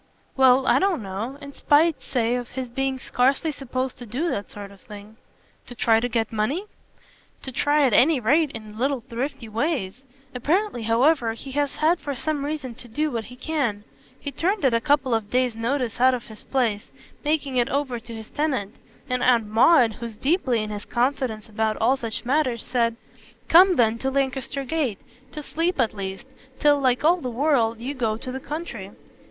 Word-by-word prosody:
"Well, 265 0 +5
I - - +4
don't 380 - +1
know. 205 +8 -5
In 280 0 -9
spite, 310 +3 +3
say, 235 -2 0
of 245 -1 -3
his 255 -2 -6
being 270 +1 -1
scarcely 270 +5 +1
supposed 260 -2 -4
to 245 - -9
do 285 +11 -1
that 200 - -4
sort 200 -1 -9
of 200 - -17
thing." 210 +1 -12 0.5
"To 245 - -9
try 225 -1 +3
to 245 +2 -2
get 225 -1 -1
money?" 265 - -1 0.8
"To 265 - -6
try 290 +3 +2
at 250 - +2
any 285 +5 +5
rate 290 +7 +3
in 215 -3 -9
little 270 0 0
thrifty 250 0 -5
ways. 225 - -2 0.3
Apparently 305 - 0
however 230 +2 +2
he 265 +4 -9
has 285 +1 -1
had 330 +3 +2
for 285 -1 -4
some 295 +1 -2
reason 290 -4 -4
to 245 - -10
do 300 +6 -1
what 230 -3 -3
he 250 - -10
can. 255 -7 -2 0.4
He 285 - -5
turned 360 - 0
at 260 - +4
a 230 - +2
couple 280 -2 +2
of 220 -2 -1
days' 250 -1 +1
notice 240 0 -2
out 255 0 +5
of 245 - -6
his 220 - -11
place, 230 -6 -1 0.3
making 295 -3 0
it 245 +1 +2
over 270 -4 -1
to 230 0 -10
his 220 -1 -10
tenant; 265 -9 -1 0.3
and 250 -1 -1
Aunt 240 -3 +4
Maud, 230 +3 +5
who's 230 -1 -8
deeply 260 - +1
in 210 - -5
his 205 -1 -6
confidence 245 -3 -1
about 220 0 -1
all 240 +4 +3
such 230 -3 -5
matters, 255 -3 0
said: 235 -2 +1 0.5
'Come 365 +2 +7
then 230 -3 +2
to 265 - -1
Lancaster 270 0 -1
Gate 270 -6 -1 0.3
to 300 - -7
sleep 330 +3 -1
at 235 -3 +2
least 195 0 -6 0.3
till, 290 -1 +4
like 255 -1 +1
all 340 +4 +5
the 265 -8 -4
world, 235 -3 +1
you 255 +5 -4
go 225 -5 -1
to 255 +2 -6
the 265 - -4
country.' 275 - -6
255 Hz, 195 wpm, -24 LUFS, 225-285 Hz, 0.8 s, Come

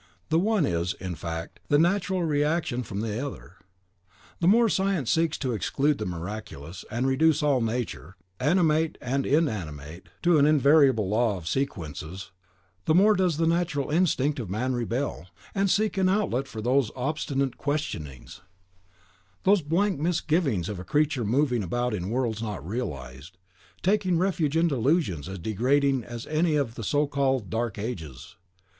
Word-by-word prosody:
"The 160 - +3
one 205 -3 +2
is, 85 -4 -1
in 95 -1 -5
fact, 80 0 -6
the 145 - +4
natural 185 +2 +1
reaction 150 -4 0
from 105 -3 -5
the 110 +3 -2
other. 100 - -8 0.8
The 170 - +1
more 230 +4 +5
science 190 - 0
seeks 165 -1 +1
to 130 -4 -2
exclude 135 - 0
the 105 - -3
miraculous, 90 -2 -7
and 120 +3 -1
reduce 150 +3 +3
all 140 -4 +3
nature, 110 - -3 0.2
animate 160 +1 +2
and 135 +2 -1
inanimate, 90 - -2
to 175 -3 +5
an 145 - +5
invariable 140 -7 +4
law 110 0 +1
of 85 -3 -9
sequences, 90 - -4 0.5
the 155 - +3
more 205 +4 +6
does 185 -6 +1
the 165 - +2
natural 165 -4 0
instinct 150 -4 +1
of 110 -7 -5
man 125 +7 -1
rebel, 120 -4 -2 0.3
and 195 -1 +1
seek 210 0 +1
an 185 -1 +3
outlet 185 - 0
for 110 -4 -7
those 130 -1 +2
obstinate 135 -1 -2
questionings, 85 - -4 1.0
those 200 -1 +4
'blank 170 +3 0
misgivings 155 - 0
of 100 -3 -5
a - - -6
creature 145 0 +1
moving 125 +2 +1
about 120 +6 -1
in 95 -2 -3
worlds 115 -2 -1
not 105 -7 -5
realised,' 75 - -6 0.5
taking 190 -2 +2
refuge 165 -4 +1
in 170 +1 +4
delusions 130 - 0
as 95 - -5
degrading 130 +7 +1
as 120 +1 -7
any 155 +1 +1
of 140 -6 0
the 115 - -7
so 145 +7 +2
called 135 -6 0
Dark 115 -1 -2
Ages." 90 - -6
135 Hz, 155 wpm, -26 LUFS, 105-160 Hz, 1.0 s, more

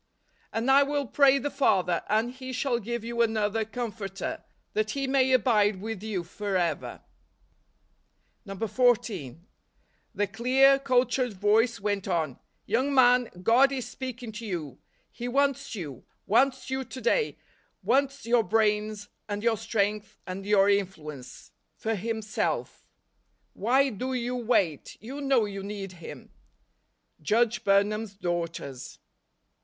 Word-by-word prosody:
" - - -37
And 235 +4 +1
I 275 +1 +7
will 285 0 0
pray 275 +3 +4
the 285 +1 -3
Father, 185 -11 +2
and 220 +3 +1
he 260 0 -8
shall 250 -1 0
give 235 +1 -4
you 235 0 -2
another 220 -1 +1
Comforter, 215 -4 -5 0.3
that 215 0 0
he 275 +4 -2
may 265 -1 +2
abide 210 -5 +3
with 220 -1 -5
you 210 -5 -3
forever 180 -2 -2 0.8
." 195 -4 -15
14. 200 - 0 0.7
The 205 - +1
clear, 260 +7 +4
cultured 250 -2 +1
voice 215 +4 +2
went 200 -1 -2
on; 160 -8 -1
" - - -46
Young 255 +7 +1
man, 250 -2 +5
God 255 +6 +5
is 260 -3 -3
speaking 250 -3 -6
to 220 +2 -8
you; 155 - -5 0.3
He 240 - -6
wants 275 -1 0
you; 150 - -7 0.2
wants 260 +5 +2
you 265 0 -1
to 260 - -9
day; 440 - +1 0.5
wants 275 0 +1
your 235 0 +3
brains, 210 -1 0 0.2
and 205 +1 -3
your 230 -1 +3
strength, 210 -1 -2
and 195 +1 -6
your 205 -2 +5
in¬ 200 -1 +3
fluence, 150 -8 -11 0.2
for 225 - -2
Himself. 220 +1 -3 0.7
Why 265 +6 +2
do 255 +5 -4
you 250 0 -2
wait? 210 - 0
You 265 +6 -7
know 270 -5 +3
you 200 -1 -6
need 200 -1 -6
Him." 170 -3 -11 0.9
Judge 225 +6 +1
Burnham's 205 +1 +1
Daughters. 170 -8 -4
220 Hz, 140 wpm, -27 LUFS, 200-255 Hz, 0.9 s, I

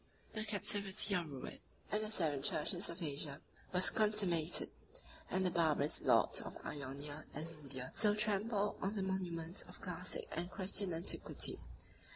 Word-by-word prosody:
The 215 -1 -3
captivity 205 -1 +2
or 175 - +1
ruin 140 -4 -7 0.3
of 210 - +1
the 215 - -3
seven 155 -9 +1
churches 175 +6 +1
of 170 +1 -6
Asia 145 -1 -3 0.3
was 180 0 +4
consummated; 195 -7 +2 0.6
and 190 +1 0
the 180 - +2
barbarous 155 -4 +3
lords - - +4
of - - -8
Ionia 145 +2 -6
and 155 +3 -4
Lydia 130 -3 -6
still 210 -2 +3
trample 210 0 +2
on 195 +3 -1
the 200 - -1
monuments 180 -2 -2
of - - -11
classic 180 -1 -2
and 175 +1 -3
Christian 190 0 +2
antiquity. 165 +3 0
180 Hz, 150 wpm, -37 LUFS, 155-200 Hz, 0.6 s, was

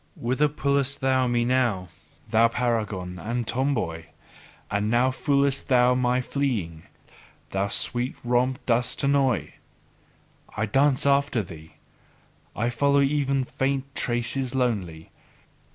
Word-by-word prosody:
Whither 130 +5 +1
pullest 140 -2 0
thou 130 -1 +2
me 120 -1 +1
now, 120 -8 0 0.4
thou 115 +1 +4
paragon 105 -7 -2
and 120 +6 -3
tomboy? 115 - -1 0.7
And 105 +1 0
now 120 +3 +3
foolest 140 0 +1
thou 125 -2 +4
me 125 0 +1
fleeing; 115 - -3 0.6
thou 95 +1 0
sweet 120 +4 0
romp 125 +2 +1
dost 125 +2 0
annoy! 140 -5 +1 1.0
I 110 - +1
dance 135 +5 +2
after 140 -4 +2
thee, 80 -3 -12 0.8
I 115 +3 -1
follow 140 +3 +2
even 140 -1 +1
faint 135 +1 -2
traces 120 +2 -1
lonely. 95 -11 -2
125 Hz, 115 wpm, -25 LUFS, 110-135 Hz, 1.0 s, thou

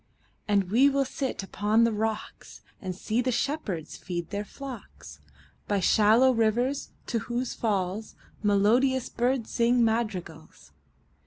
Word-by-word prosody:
And 200 -3 +1
we 260 +6 +6
will 275 0 +1
sit 265 -5 -3
upon 210 +4 +2
the 230 - +3
rocks, 220 0 -4 0.2
5 - - -14
And 185 - -3
see 220 +5 -1
the 255 +1 0
shepherds 225 - -2
feed 175 -1 -5
their 205 0 -2
flocks 260 +1 -10 0.5
By 205 -1 +1
shallow 220 +7 +5
rivers, 240 +4 +1 0.2
to 230 - -1
whose 240 +2 -3
falls 205 -1 -2 0.3
Melodious 230 +6 +3
birds 245 0 -1
sing 235 0 +3
madrigals. 190 - -3
225 Hz, 135 wpm, -27 LUFS, 205-250 Hz, 0.5 s, we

